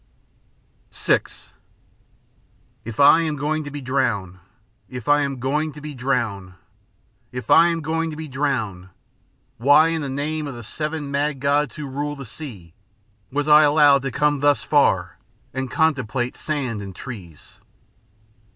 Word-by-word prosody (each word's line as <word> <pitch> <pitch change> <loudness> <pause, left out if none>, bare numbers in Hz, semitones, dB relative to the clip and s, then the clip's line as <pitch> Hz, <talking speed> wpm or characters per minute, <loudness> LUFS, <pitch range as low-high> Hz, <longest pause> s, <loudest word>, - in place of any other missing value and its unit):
VI - - +3 1.6
"If 115 +1 -8
I 145 +3 +7
am 155 -2 -1
going 155 +2 -1
to - - -5
be 145 0 -7
drowned 120 -9 -1 0.5
if 125 +1 -8
I 145 0 +4
am 140 -2 -2
going 150 +5 -1
to 150 - -10
be 150 0 -7
drowned 120 -8 -2 0.8
if 125 0 -5
I 165 +1 +7
am 165 -1 -1
going 160 +2 -1
to 155 - -6
be 160 0 -6
drowned, 125 -10 -2 0.7
why, 145 +6 +5
in 165 -1 -1
the 140 - -4
name 150 +3 -3
of 135 - -6
the 120 - -9
seven 150 +4 -4
mad 145 0 -1
gods 140 -2 +1
who 150 - -6
rule 145 +2 -4
the 140 -2 -8
sea, 110 - -9 0.6
was 145 +2 -1
I 150 0 +8
allowed 145 -2 +5
to 135 - -3
come 145 +2 +1
thus 145 +1 +2
far 95 - +2 0.3
and 130 0 -3
contemplate 130 -6 0
sand 130 -8 -3
and 95 -2 -8
trees?" 90 - -10
140 Hz, 150 wpm, -22 LUFS, 125-150 Hz, 1.6 s, I